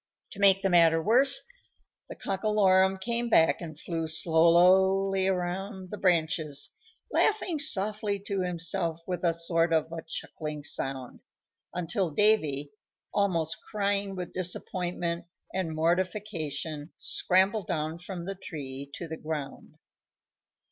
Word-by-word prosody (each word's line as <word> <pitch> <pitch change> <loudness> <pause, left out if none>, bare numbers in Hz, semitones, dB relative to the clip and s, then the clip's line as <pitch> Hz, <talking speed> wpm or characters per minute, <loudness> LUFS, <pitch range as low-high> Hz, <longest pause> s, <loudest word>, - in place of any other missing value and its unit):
To 200 - -10
make 195 -1 +5
the 195 - +2
matter 165 -2 +5
worse, 250 +9 +4 0.7
the - - -7
Cockalorum 195 -2 +2
came 235 +3 -1
back 165 -6 +4
and 155 -3 -8
flew 165 -2 -3
slowly 180 +4 +4
around 190 +1 -3
the 210 - -5
branches, 160 -5 +1 0.4
laughing 375 -7 +1
softly 210 -6 +1
to 200 -3 -1
himself 170 -1 -1
with 180 -1 -4
a 170 - +4
sort 165 0 0
of 160 0 +1
a 165 -1 -5
chuckling 155 -2 -6
sound, 135 -3 -3 0.6
until 180 +1 0
Davy, 150 -7 +2 0.4
almost 170 -6 0
crying 200 -1 -1
with 180 -1 -6
disappointment 175 -1 -2 0.3
and 175 -4 -2
mortification, 165 -3 -2
scrambled 190 +2 +1
down 155 +1 -2
from 175 0 -7
the 195 +3 -4
tree 140 -7 -7
to 170 - -6
the 160 0 -6
ground. 155 -3 -6
180 Hz, 120 wpm, -28 LUFS, 160-195 Hz, 0.7 s, make